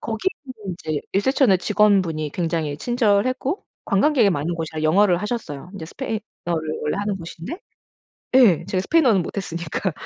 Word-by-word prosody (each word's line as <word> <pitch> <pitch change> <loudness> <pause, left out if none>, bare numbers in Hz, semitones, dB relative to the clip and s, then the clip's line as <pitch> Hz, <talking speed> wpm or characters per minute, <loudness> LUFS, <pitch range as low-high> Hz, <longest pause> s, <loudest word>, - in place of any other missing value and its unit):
거기는 225 - -4
이제 155 -2 -3
리셉션의 205 -1 +3
직원분이 190 -7 +2
굉장히 160 -4 -1
친절했고 245 - +1 0.2
관광객이 225 +1 +3
많은 160 +2 -1
곳이라 160 -1 -4
영어를 180 +4 +4
하셨어요. 185 - -5
이제 160 -5 -7
스페인어를 220 +1 -4 0.6
원래 150 +5 -1
하는 205 -1 -1
곳인데 170 - -8 0.7
예 225 - +6
제가 185 - 0
스페인어는 250 - +4
못했으니까 170 -1 -3
195 Hz, 375 characters per minute, -22 LUFS, 165-230 Hz, 0.7 s, 예